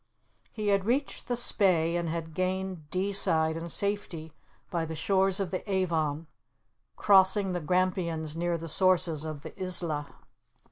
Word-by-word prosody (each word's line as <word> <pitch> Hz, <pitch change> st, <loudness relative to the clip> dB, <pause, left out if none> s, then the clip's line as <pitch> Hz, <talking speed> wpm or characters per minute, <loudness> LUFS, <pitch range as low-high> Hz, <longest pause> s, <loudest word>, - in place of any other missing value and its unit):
He 210 Hz, -2 st, -3 dB
had 200 Hz, -1 st, +1 dB
reached 265 Hz, +5 st, -1 dB
the 245 Hz, -, -1 dB
Spey, 180 Hz, -8 st, +3 dB
and 170 Hz, -1 st, -2 dB
had 160 Hz, -1 st, -5 dB
gained 185 Hz, -3 st, -3 dB
Deeside 180 Hz, -4 st, +1 dB
in 165 Hz, +1 st, -6 dB
safety 180 Hz, -6 st, -2 dB, 0.4 s
by 170 Hz, -3 st, -1 dB
the 160 Hz, 0 st, -5 dB
shores 190 Hz, +3 st, +2 dB
of 190 Hz, -4 st, -3 dB
the 185 Hz, -, -3 dB
Avon, 165 Hz, -5 st, -1 dB, 0.7 s
crossing 190 Hz, 0 st, +4 dB
the 175 Hz, -1 st, -3 dB
Grampians 170 Hz, -2 st, -1 dB
near 170 Hz, 0 st, -1 dB
the 165 Hz, 0 st, -8 dB
sources 170 Hz, -2 st, +2 dB
of 155 Hz, -2 st, -7 dB
the -, -, -9 dB
Isla. 170 Hz, -5 st, 0 dB
175 Hz, 145 wpm, -28 LUFS, 160-190 Hz, 0.7 s, crossing